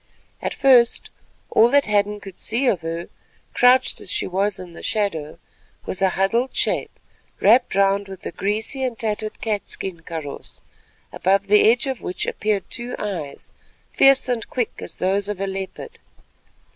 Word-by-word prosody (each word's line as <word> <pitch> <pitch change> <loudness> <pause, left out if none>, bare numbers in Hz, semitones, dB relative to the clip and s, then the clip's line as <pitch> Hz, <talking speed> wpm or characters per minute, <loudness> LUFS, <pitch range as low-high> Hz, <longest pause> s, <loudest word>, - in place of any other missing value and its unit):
At - - -3
first 250 -4 +4 0.4
all 230 +2 +5
that 285 +2 +4
Hadden 210 0 +1
could 195 -2 -12
see 240 +5 -1
of 195 -9 +2
her, 165 +1 -4 0.5
crouched 255 +1 +4
as - - -2
she - - +1
was 195 +2 0
in 180 -2 -10
the - - -10
shadow, 165 -8 -2 0.5
was 185 - -3
a 190 - +4
huddled 225 +8 0
shape - - -1 0.4
wrapped 225 +3 +4
round 200 0 +2
with 190 -1 -10
a - - -3
greasy 215 +9 -2
and 250 -3 -2
tattered 215 -1 -3
catskin 195 -5 -4
kaross, 160 -3 -8 0.5
above 195 +2 +1
the 210 +2 +5
edge 245 +5 +2
of 265 -4 -3
which 180 - -3
appeared 210 -2 -1
two 240 +1 -5
eyes, 170 -9 -6 0.4
fierce 270 -1 +5
and 245 -3 -2
quick 245 -4 -1
as - - -8
those 195 +2 0
of 205 -2 -4
a 195 - -1
leopard. 195 - -6
205 Hz, 160 wpm, -22 LUFS, 190-235 Hz, 0.5 s, all